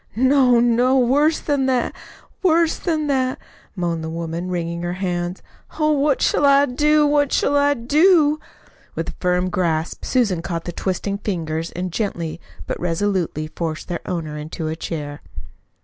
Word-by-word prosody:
"No, 260 0 +4
no, 245 +2 +3
worse 285 +6 +3
than 280 -3 0
that, 255 -2 +1 0.5
worse 335 -3 +3
than 315 -4 -1
that!" 260 -3 0 0.4
moaned 170 -3 -2
the 160 - -4
woman, 165 +2 -4
wringing 170 -1 -3
her 175 0 -2
hands. 180 -1 -3 0.3
"Oh, 305 -1 +2
what 285 -1 +2
shall - - +2
I 280 0 +6
do, 300 +3 +3
what 290 -1 +2
shall 285 - +2
I 285 0 +3
do?" 300 +4 +4 0.6
With - - -3
a - - -6
firm 180 0 +1
grasp 165 -3 -1
Susan 210 -10 +1
caught 165 -1 -4
the 175 - -3
twisting 195 +3 -3
fingers 165 -5 -3
and 180 0 -4
gently 170 -6 -3 0.2
but - - -4
resolutely 175 -2 -1
forced 160 -2 -4
their 175 - -3
owner 155 -4 -4
into 155 +2 -5
a 160 - -3
chair. 145 -3 -5
195 Hz, 160 wpm, -21 LUFS, 170-280 Hz, 0.6 s, I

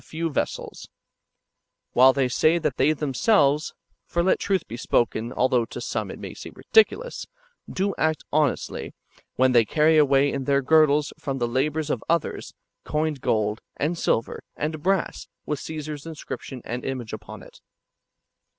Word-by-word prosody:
few 165 0 -3
vessels; - - -4 1.0
while 130 +2 +7
they 130 -1 +1
say 155 +6 +3
that 150 -5 -2
they 140 +4 +4
themselves 150 - +2 0.3
(for 170 - 0
let 185 - +2
truth 195 -2 0
be 115 - -6
S2:)okeii, 120 -1 0
although 125 -1 +3
to - - -8
some - - -3
it - - -7
may - - -8
seem - - -10
ridiculous) 480 +2 +2 0.4
do 195 +1 -1
act 160 -1 +1
honestly, 150 -2 -1 0.4
when 130 0 +3
they 120 -2 +5
carry 155 +7 +3
away 140 -1 +4
in 135 -1 -3
their 140 0 +2
girdles 150 0 +4
from 135 -1 -3
the 120 -2 0
labours 150 +5 -1
of - - -2
others, 170 -1 -1 0.3
coined 150 -2 -2
gold, 105 0 0 0.2
and 155 +5 0
silver, 115 -8 -1
and 155 +1 -3
brass, 190 +2 -1 0.2
with 150 -2 -2
Co3sar's 155 -1 -6
inscription 145 -5 -7
and 120 +1 -4
image 125 -5 -4
upon 110 - -8
it. - - -16
145 Hz, 155 wpm, -24 LUFS, 130-160 Hz, 1.0 s, while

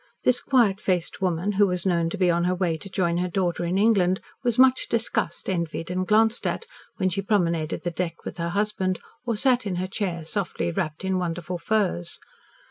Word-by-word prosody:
This 250 0 +3
quiet 225 -7 +3
faced 180 0 -1
woman, 180 +1 0
who 205 0 +4
was 180 -1 -2
known 170 -3 +2
to - - -5
be 180 -2 +3
on 170 +1 +1
her 180 +1 +1
way 180 -2 0
to 195 +5 -6
join 175 -3 0
her 180 - 0
daughter 175 -1 -1
in 175 +2 0
England, 195 -3 +3 0.2
was 240 -2 +1
much 260 0 +5
discussed, 225 -7 -1
envied, 170 -2 -2
and 185 0 -1
glanced 220 +2 +3
at, - - -2 0.3
when 185 - +1
she 190 +2 -1
promenaded 170 -6 0
the 175 - -1
deck 165 -1 -4
with - - -6
her 170 0 -1
husband, 195 -1 0 0.3
or 230 - +1
sat 255 +1 +3
in 185 - -2
her 180 +1 -1
chair 185 -4 -3
softly 180 -1 -2
wrapped 170 -1 -3
in 190 -1 +1
wonderful 175 0 -3
furs. 195 - 0
185 Hz, 205 wpm, -25 LUFS, 170-205 Hz, 0.3 s, much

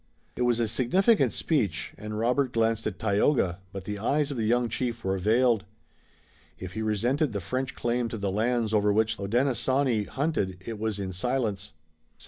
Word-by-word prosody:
It - - -4
was 120 -1 +2
a 115 - +1
significant 185 - +3
speech, 105 - -1
and 105 0 -6
Robert 125 +4 +1
glanced 115 -1 +1
at 105 - -4
Tayoga, 100 - +1
but 95 -1 -6
the 105 0 -5
eyes 145 +6 +1
of 135 - -4
the 110 -2 0
young 120 +1 +2
chief 115 +1 -3
were 95 0 0
veiled. 115 +2 +3 0.9
If 95 0 -7
he 110 - -3
resented 120 +6 0
the 100 - -1
French 130 +3 -3
claim 120 0 -1
to 115 - -5
the 100 -2 -2
lands 115 +1 0
over 105 -1 +3
which 110 +1 +1
the 100 - -4
Hodenosaunee 130 0 +1
hunted 135 - -1
it 115 -2 -5
was 110 -1 -1
in 95 -2 -4
silence. 110 -1 -1
St. 105 - -18
115 Hz, 185 wpm, -27 LUFS, 105-125 Hz, 0.9 s, significant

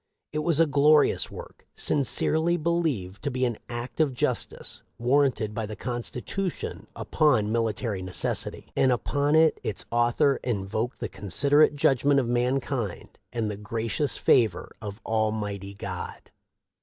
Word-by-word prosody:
It 155 - -2
was 155 0 +2
a 165 - +6
glorious 150 +1 +4
work, - - -11
" - - -49
sincerely 160 +4 +2
believed 155 - -1
to 145 - -1
be 130 -1 0
an 120 -3 -2
act 120 +4 -6
of 145 -5 +2
justice - - -2 0.2
warranted 125 -3 +2
by 110 -1 -3
the 105 - -6
constitution 125 - -4
upon 120 -9 +2
military 110 -3 -1
necessity," 90 0 -3
and 130 - +4
upon 145 +4 +1
it 160 0 +4
its 105 - -3
author 120 +4 +3
" - - -40
invoked 110 +5 -3
the - - -1
considerate 145 - +2
judgment 140 0 +3
of 125 - -1
mankind 125 -3 -2
and 110 -3 -1
the 100 - -6
gracious 115 +6 -2
favor 110 -8 +2
of 105 -1 -6
Almighty 105 -3 -2
God." - - -7
120 Hz, 145 wpm, -26 LUFS, 110-145 Hz, 0.2 s, a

